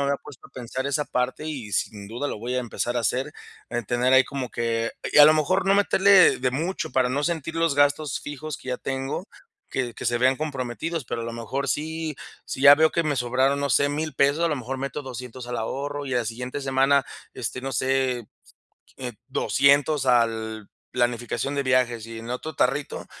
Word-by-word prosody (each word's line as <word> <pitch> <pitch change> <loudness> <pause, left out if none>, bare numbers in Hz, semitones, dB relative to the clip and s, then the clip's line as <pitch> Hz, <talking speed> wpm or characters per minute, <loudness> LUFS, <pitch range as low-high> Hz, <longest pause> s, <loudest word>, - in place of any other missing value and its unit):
había 140 0 +1
puesto 145 -4 -13
a - - -33
pensar 130 +2 -5
esa 145 +1 0
parte, 125 +5 -2
y 130 -9 -5
sin 100 -2 -2
duda 125 +6 -3
lo - - -5
voy 120 +4 -4
a - - +1
empezar 120 0 -3
a - - +1
hacer. 130 +6 -1 0.4
Eh, 120 0 -2
tener 125 +1 +1
ahí 130 0 +7
como 135 -2 -5
que 115 -1 -1 0.2
Y - - +5
a 145 - +11
lo 155 - +6
mejor, 185 +5 +1
no 195 - +5
meterle 200 -1 +5
de 130 0 0
mucho, 165 +7 -3
para 130 -1 +2
no 140 +3 -1
sentir 160 -2 -2
los 165 -3 +2
gastos 145 0 +2
fijos 145 0 -6
que 130 - -12
ya 125 - -1
tengo, 135 +8 -4 0.4
que 125 -3 -2
que - - -8
se 120 0 +1
vean 130 +2 +4
comprometidos. 150 +1 -3
Pero 115 - -3
a - - -4
lo 115 - -5
mejor 130 +4 -3
sí 160 -1 -2 0.3
si 135 - -5
ya 145 0 +10
veo 160 +1 +4
que 170 - +1
me 150 - +1
sobraron, 130 +3 +1
no 140 -1 -1
sé, 140 +3 +4
$1000 150 +1 -3
pesos, 140 +4 +2
a - - +3
lo 150 - -1
mejor 130 +2 -5
meto 135 +2 -4
$200 125 -1 -8
al 120 - -3
ahorro. 140 +5 -4
Y 130 - -2
a 125 - +3
la 120 - -1
siguiente 125 +5 -5
semana, 135 +1 +3 0.3
este, 130 - -4
no 135 - -3
sé, 130 -1 0 0.7
eh, 125 -2 -5
$200 140 +1 +3
al 110 -3 +1 0.2
planificación 120 +2 -1
de 140 - 0
viajes. 125 -3 +1
Y 115 -1 -7
en 115 - -9
el - - -4
otro 155 +5 -5
tarrito, 135 +3 -1
130 Hz, 215 wpm, -25 LUFS, 120-145 Hz, 0.7 s, a